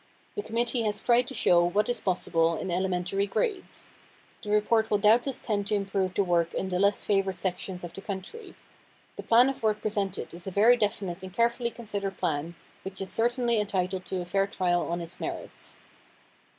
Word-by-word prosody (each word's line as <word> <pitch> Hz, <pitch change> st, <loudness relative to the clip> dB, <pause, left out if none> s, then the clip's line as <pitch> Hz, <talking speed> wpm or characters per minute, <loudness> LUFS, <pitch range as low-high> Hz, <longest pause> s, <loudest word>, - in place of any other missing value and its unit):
The 415 Hz, -, -2 dB
committee 235 Hz, -, -1 dB
has 210 Hz, -2 st, 0 dB
tried 245 Hz, 0 st, +4 dB
to 265 Hz, -, -4 dB
show 175 Hz, -1 st, +4 dB
what 200 Hz, +5 st, +1 dB
is 245 Hz, -2 st, -1 dB
possible 165 Hz, -3 st, +1 dB
in 185 Hz, -, -4 dB
elementary 185 Hz, +2 st, 0 dB
grades. 415 Hz, -, -3 dB, 0.5 s
The 210 Hz, -, -8 dB
report 220 Hz, +1 st, +2 dB
will 210 Hz, -, +3 dB
doubtless 230 Hz, +6 st, +3 dB
tend 205 Hz, -3 st, -2 dB
to 210 Hz, -, +1 dB
improve 195 Hz, -2 st, -1 dB
the 200 Hz, -, +3 dB
work 170 Hz, -2 st, +1 dB
in 190 Hz, -, -2 dB
the 180 Hz, -1 st, -1 dB
less 200 Hz, +1 st, +2 dB
favored 195 Hz, -2 st, +1 dB
sections 180 Hz, 0 st, -3 dB
of 175 Hz, -, -7 dB
the 195 Hz, -, -8 dB
country. 200 Hz, -, -7 dB, 0.6 s
The -, -, -6 dB
plan 240 Hz, +3 st, +5 dB
of 270 Hz, -, -3 dB
work 215 Hz, -1 st, +1 dB
presented 205 Hz, -3 st, -2 dB
is 175 Hz, +2 st, -9 dB
a -, -, 0 dB
very 215 Hz, +6 st, +5 dB
definite 200 Hz, -5 st, -2 dB
and 190 Hz, 0 st, -8 dB
carefully 235 Hz, +3 st, +1 dB
considered 205 Hz, -5 st, -5 dB
plan, 155 Hz, +4 st, -2 dB, 0.3 s
which 190 Hz, 0 st, -7 dB
is 190 Hz, -1 st, -3 dB
certainly 235 Hz, +1 st, +1 dB
entitled 190 Hz, -2 st, -1 dB
to 185 Hz, -1 st, -3 dB
a -, -, -5 dB
fair 195 Hz, +2 st, +1 dB
trial 175 Hz, -3 st, 0 dB
on 170 Hz, +1 st, -2 dB
its 170 Hz, 0 st, -7 dB
merits. -, -, -6 dB
200 Hz, 190 wpm, -28 LUFS, 185-225 Hz, 0.6 s, plan